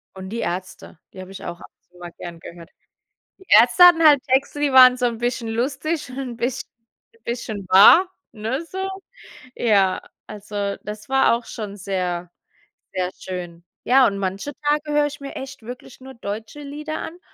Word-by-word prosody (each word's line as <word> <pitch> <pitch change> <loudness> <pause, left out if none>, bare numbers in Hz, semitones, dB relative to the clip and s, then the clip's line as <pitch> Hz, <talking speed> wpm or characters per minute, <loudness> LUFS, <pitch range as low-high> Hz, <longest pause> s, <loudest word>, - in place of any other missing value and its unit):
Und 190 0 -8
die 230 +2 -5
Ärzte, 180 -1 -6
die 185 - -9
habe 185 +1 -11
ich 195 0 -10
auch 175 0 -7
ab - - -14
und - - -62
zu 180 - -21
mal 175 -1 -9
gern 170 -1 -8
gehört. 170 -1 -12 0.7
Die 380 - -19
Ärzte 355 - +7
hatten 340 -2 +7
halt 285 -3 +6
Texte, 275 +2 0
die 290 -2 +1
waren 255 -1 +8
so 250 -1 0
'n 230 -2 -3
bisschen 240 -1 -2
lustig 270 +6 -2
und 255 - -8
'n 250 -3 -5
bisschen 240 +2 -3 0.6
bisschen 220 -5 -5
wahr, 330 - +7 0.2
ne, 230 +8 -3
so. 380 +2 -4 0.7
Ja, 200 -5 +2 0.3
also, 205 -1 -4
das 210 0 -8
war 270 -2 +3
auch 235 - -7
schon 205 -2 -7
sehr, 180 -3 -3 0.7
sehr 185 -1 -1
schön. 175 -2 -7 0.2
Ja, 260 0 +5
und 200 - -1
manche 195 +9 -4
Tage 295 0 0
höre 295 0 +3
ich 290 0 -7
mir 275 - -8
echt 265 -3 -8
wirklich 245 +2 -10
nur 265 0 -11
deutsche 225 +5 -7
Lieder 300 +2 -6
an 345 +2 -8
235 Hz, 185 wpm, -22 LUFS, 195-275 Hz, 0.7 s, waren